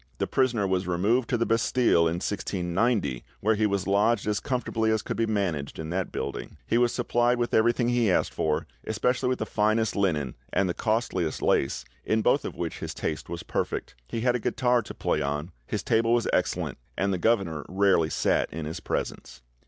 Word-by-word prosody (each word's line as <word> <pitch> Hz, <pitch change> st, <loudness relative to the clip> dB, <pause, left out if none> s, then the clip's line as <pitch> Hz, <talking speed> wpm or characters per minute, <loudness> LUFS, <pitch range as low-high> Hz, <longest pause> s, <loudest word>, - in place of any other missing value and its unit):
The -, -, 0 dB
prisoner 125 Hz, -6 st, +1 dB
was 95 Hz, -1 st, 0 dB
removed 105 Hz, +8 st, +1 dB
to 120 Hz, -, +2 dB
the 115 Hz, -, +1 dB
Bastille 115 Hz, -6 st, +3 dB
in 80 Hz, -, 0 dB
1690, 90 Hz, -, -1 dB, 0.2 s
where 110 Hz, +2 st, +2 dB
he 110 Hz, 0 st, +2 dB
was 100 Hz, -2 st, -1 dB
lodged 100 Hz, +2 st, +2 dB
as 105 Hz, -1 st, 0 dB
comfortably 125 Hz, -4 st, -1 dB
as 110 Hz, -1 st, +1 dB
could -, -, -3 dB
be 115 Hz, 0 st, 0 dB
managed 95 Hz, -10 st, -1 dB
in 80 Hz, 0 st, -5 dB
that 95 Hz, +1 st, -2 dB
building; -, -, -5 dB
he 115 Hz, -, +2 dB
was 120 Hz, -1 st, +3 dB
supplied 120 Hz, +1 st, +1 dB
with 120 Hz, 0 st, -1 dB
everything 120 Hz, +2 st, +3 dB
he 120 Hz, -3 st, +2 dB
asked 90 Hz, -, +1 dB
for, 75 Hz, -1 st, 0 dB, 0.2 s
especially 125 Hz, +4 st, 0 dB
with 130 Hz, -, +1 dB
the 110 Hz, -, -2 dB
finest 110 Hz, +1 st, +1 dB
linen 75 Hz, -10 st, 0 dB, 0.2 s
and 100 Hz, -, +2 dB
the 90 Hz, -, -1 dB
costliest 110 Hz, -8 st, -1 dB
lace, 65 Hz, -2 st, +1 dB, 0.2 s
in 110 Hz, 0 st, +1 dB
both -, -, +3 dB
of -, -, -5 dB
which -, -, -4 dB
his -, -, -5 dB
taste 75 Hz, -1 st, -3 dB
was 85 Hz, 0 st, -5 dB
perfect; -, -, -3 dB
he 115 Hz, -, -3 dB
had 125 Hz, 0 st, +2 dB
a -, -, 0 dB
guitar 125 Hz, +1 st, +2 dB
to 105 Hz, -, -9 dB
play -, -, 0 dB
on, 75 Hz, +5 st, -2 dB, 0.2 s
his -, -, -2 dB
table 115 Hz, +1 st, +2 dB
was 120 Hz, -1 st, +2 dB
excellent, -, -, 0 dB, 0.2 s
and 100 Hz, +1 st, +1 dB
the 90 Hz, -, -1 dB
governor 90 Hz, -8 st, +1 dB
rarely 95 Hz, -4 st, +3 dB
sat -, -, +1 dB
in 80 Hz, 0 st, -5 dB
his 80 Hz, +2 st, -5 dB
presence." -, -, -4 dB
105 Hz, 200 wpm, -27 LUFS, 85-115 Hz, 0.2 s, Bastille